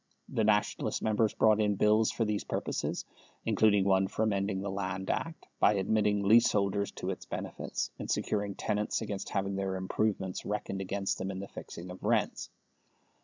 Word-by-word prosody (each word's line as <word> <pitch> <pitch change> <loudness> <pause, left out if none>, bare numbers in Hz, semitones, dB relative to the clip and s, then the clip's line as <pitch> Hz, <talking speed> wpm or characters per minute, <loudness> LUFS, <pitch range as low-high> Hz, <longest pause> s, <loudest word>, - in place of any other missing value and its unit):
The 110 - 0
Nationalist 105 -1 +1
members 110 0 +2
brought 110 -1 +4
in 105 -1 +2
Bills 105 +2 +4
for 115 - 0
these 105 -1 -1
purposes, - - -2 0.4
including 105 -3 +4
one 95 0 +3
for 110 - -1
amending 100 -2 0
the 100 0 -3
Land 95 -1 -2
Act 165 0 -4
by 105 - +5
admitting 105 +1 +2
leaseholders 100 -2 +4
to - - -3
its - - -7
benefits - - -4
and - - -5
securing 100 -2 -1
tenants 105 +2 -1
against 100 -2 -4
having 100 -1 -1
their 95 -1 -1
improvements 95 0 -1
reckoned 100 -2 -3
against 95 +1 -2
them 95 - -3
in 95 -1 -4
the 100 - -6
fixing 90 +1 -8
of 90 - -10
rents. - - 0
100 Hz, 170 wpm, -31 LUFS, 95-105 Hz, 0.4 s, by